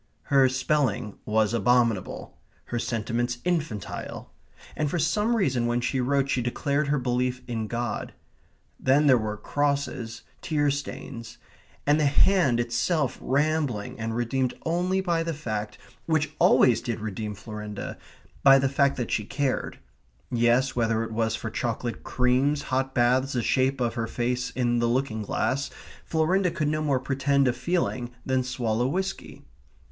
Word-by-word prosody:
Her 135 -2 +4
spelling 130 -5 0
was 110 0 +2
abominable. 115 -2 +1 0.3
Her 120 - -3
sentiments 120 +1 -1
infantile. 155 - -3 0.4
And 150 -1 0
for 175 - -1
some 210 +9 +1
reason 130 - +1
when 120 0 +1
she 130 +1 0
wrote 140 +2 +1
she 130 -2 0
declared 140 +4 -1
her 145 +1 +2
belief 125 0 -1
in 115 -3 -3
God. 120 0 -3 0.7
Then 140 +3 +3
there 135 -3 +7
were 105 -1 -3
crosses 140 -4 -2 0.2
tear 145 -3 +1
stains; 120 -4 -6 0.5
and 145 +2 +4
the 150 - +3
hand 140 -4 +4
itself 120 +5 0
rambling 140 -7 0
and 115 0 -3
redeemed 125 +2 0
only 180 +3 +1
by 170 -3 0
the 165 -1 -2
fact 110 -7 -4 0.3
which 155 -2 +1
always 120 -3 +5
did 115 -2 -3
redeem 105 0 -4
Florinda 105 0 -6 0.5
by 135 -1 +8
the 135 0 +2
fact 140 0 +2
that 120 -3 -3
she 105 - 0
cared. 135 +5 -2 0.5
Yes, 120 +3 +2
whether 115 -2 +1
it 115 - -6
was 110 0 0
for 110 0 -5
chocolate 120 +1 -3
creams, 130 +4 +1
hot 130 +1 -1
baths, 130 +3 +3
the 120 -2 0
shape 130 +3 +1
of 120 -2 0
her 115 -1 -2
face 125 +1 -1
in 120 -1 0
the 120 - +2
looking 120 -3 0
glass, 135 +6 -1 0.3
Florinda 180 +4 +2
could 160 -4 -1
no 155 0 0
more 140 -4 +1
pretend 135 +1 +1
a 125 - +2
feeling 150 -7 -1 0.2
than 130 -1 +1
swallow 120 -2 -1
whisky. 190 +7 -4
130 Hz, 150 wpm, -26 LUFS, 120-145 Hz, 0.7 s, by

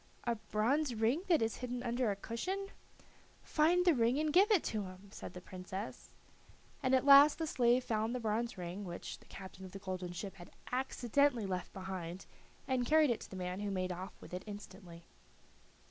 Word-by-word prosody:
"A 235 - +1
bronze 235 +5 0
ring 225 +9 +2
that 330 -10 +4
is 225 - -1
hidden 250 -1 -4
under 240 -1 0
a 200 - 0
cushion." 370 - -4 0.7
"Find 345 +4 +3
the 350 - +6
ring 240 0 +2
and 305 0 0
give 390 +5 +6
it 410 -7 +4
to 215 -2 -2
him," 185 +2 -11
said - - -8
the 180 - -7
Princess. 185 +3 -7 0.7
And 260 0 +3
at 260 - +2
last 285 +1 +9
the 325 - -1
slave 250 -4 +3
found 225 0 -1
the - - -1
bronze 230 +1 -1
ring, 180 +3 -5
which 175 -2 -6
the - - -20
captain 190 0 -10
of 185 0 -9
the - - -5
golden 185 -2 -4
ship 195 +2 -6
had 175 - -11 0.2
accidentally 255 -1 +1
left 180 -2 -3
behind 185 -2 -6 0.4
and 260 -2 +1
carried 310 -2 +5
it 235 - -1
to - - -9
the - - -8
man, 180 0 -3
who 205 0 -2
made 185 -2 -1
off 185 +2 -7
with - - -12
it 180 - -3
instantly. 185 -4 -10
225 Hz, 195 wpm, -35 LUFS, 190-260 Hz, 0.7 s, last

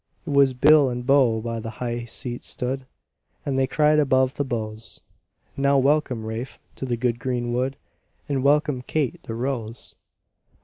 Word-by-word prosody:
It - - -4
was 140 -2 +4
bill 145 +1 +6
and 120 0 -4
bow 130 -5 +4
by 115 0 -3
the 115 - -5
high 120 -1 -3
seat 120 +1 -5
stood, 130 +1 -3 0.6
And 140 - -1
they 135 0 +2
cried 150 +2 +3
above 130 -2 +3
the 145 - -1
bows, 110 -3 -4 0.6
"Now 140 0 +3
welcome, 135 -4 +1
Rafe, 115 +4 -5 0.2
to - - -4
the 120 -2 -1
good 120 0 0
green 120 -1 -2
wood, 130 +2 -1 0.5
And 140 -2 0
welcome 145 -2 +2
Kate 140 0 -2
the 115 - -6
Rose!" 120 -2 -4
130 Hz, 165 wpm, -24 LUFS, 120-140 Hz, 0.6 s, bill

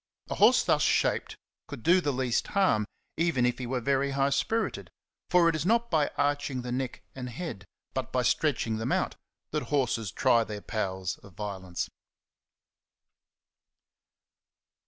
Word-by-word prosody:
A - - +2
horse - - +5
thus - - +2
shaped - - +1 0.3
could 115 - -8
do 180 +2 +5
the 145 - 0
least 125 -2 0
harm, 145 - +2 0.3
even 160 -7 +2
if 125 +1 0
he 125 - -4
were 130 +1 -1
very 140 +2 +1
high 140 0 +3
spirited; 225 +10 -1 0.4
for 180 -2 +5
it 165 - +3
is 155 - -1
not 235 +5 +2
by 155 -3 +3
arching 145 -2 0
the 125 - -4
neck 130 0 -3
and 125 -1 -6
head, 120 - -6 0.3
but - - -3
by - - +1
stretching 110 -1 +1
them 110 - -2
out, - - 0 0.4
that - - 0
horses 120 -8 0
try 120 -3 +3
their 105 -2 -6
powers 95 -5 -3
of 100 - -16
violence. 95 -4 -4
130 Hz, 155 wpm, -29 LUFS, 110-150 Hz, 0.4 s, horse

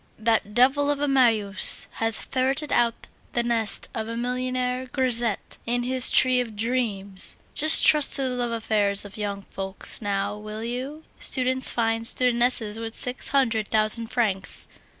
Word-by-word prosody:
"That 220 -2 0
devil 270 +4 +3
of 290 -1 0
a 290 - 0
Marius 225 -7 +2
has 225 -1 0
ferreted 270 +3 -2
out 235 -1 +1 0.3
the 240 - 0
nest 230 -3 -1
of 220 -1 -4
a 230 0 -5
millionaire 250 +1 -2
grisette 245 -4 -2
in 245 +1 0
his 255 0 +2
tree 255 -1 +4
of 225 -3 -7
dreams! 205 -4 +1 0.2
Just 310 +2 +5
trust 300 -2 +5
to 275 - 0
the 260 - -1
love 245 -1 -2
affairs 210 -3 0
of 205 0 -11
young 200 -2 -4
folks 195 +3 -2
now, 200 0 -2
will 215 +1 -7
you! 260 +6 -5 0.2
Students 260 0 +2
find 225 -1 -1
studentesses 240 -3 +1
with 225 0 -5
six 250 +1 +1
hundred 230 -6 +1
thousand 220 +1 0
francs. 220 -6 -2
235 Hz, 155 wpm, -24 LUFS, 215-255 Hz, 0.3 s, Just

